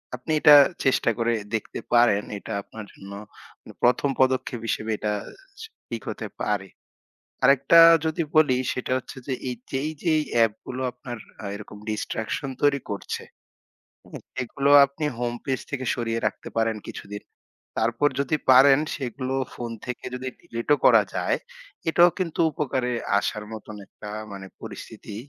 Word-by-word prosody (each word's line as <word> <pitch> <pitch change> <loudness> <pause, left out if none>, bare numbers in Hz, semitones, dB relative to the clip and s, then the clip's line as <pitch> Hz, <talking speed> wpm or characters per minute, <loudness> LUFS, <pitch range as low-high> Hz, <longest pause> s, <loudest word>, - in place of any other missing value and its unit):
আপনি 125 +5 -6
এটা 150 -2 +9 0.3
চেষ্টা 130 - +3
করে 120 0 +1 0.2
দেখতে 110 - -4
পারেন 120 -4 +5
এটা 110 - -7
আপনার 110 0 -10
জন্য 100 +1 -12 0.5
মানে - - -13
১ম 125 +3 +3
পদক্ষেপ 130 -2 +1
হিসেবে 110 +1 -1
এটা 105 0 -1 0.8
ঠিক 115 -2 -4
হতে - - -5
পারে। 105 -2 -1 0.8
আরেকটা 140 +4 +6 0.3
যদি 160 +1 0
বলি 145 -5 +5 0.2
সেটা 125 - -4
হচ্ছে 130 - -9
যে 135 - -1 0.2
এই 125 - -3 0.2
যেই, 135 +3 -1
যেই 160 -3 +3 0.2
app 110 -2 +1
গুলো 130 +1 -4
আপনার 120 0 -8 0.3
আ - - -5
এরকম 105 0 -10
distraction 110 +5 -3
তৈরি 145 -1 +3
করছে, 100 - -4 0.9
হ্যাঁ? - - -9 0.2
এগুলো 140 +3 0 0.2
আপনি 140 +3 -6
homepage 120 +2 -2
থেকে 135 -3 -3
সরিয়ে 115 -1 -2
রাখতে - - -4
পারেন 115 -1 +1
কিছুদিন। 105 +1 -8 0.6
তারপর 115 +6 +2
যদি 140 +2 +1 0.2
পারেন 135 +2 +7 0.2
সেগুলো 130 0 -4 0.2
phone 120 -1 -5
থেকে 125 -1 -6
যদি 130 +1 -5
delete 115 +4 -5
ও - - -10
করা - - +7
যায় - - +1 0.5
এটাও 175 +2 +6
কিন্তু 170 -4 -3
উপকারে 135 -5 -1 0.3
আসার 105 +1 -3
মতন 110 -1 -8
একটা 105 - -11 0.2
মানে 95 -1 -8
পরিস্থিতি 100 - -9
125 Hz, 145 wpm, -25 LUFS, 110-140 Hz, 0.9 s, এটা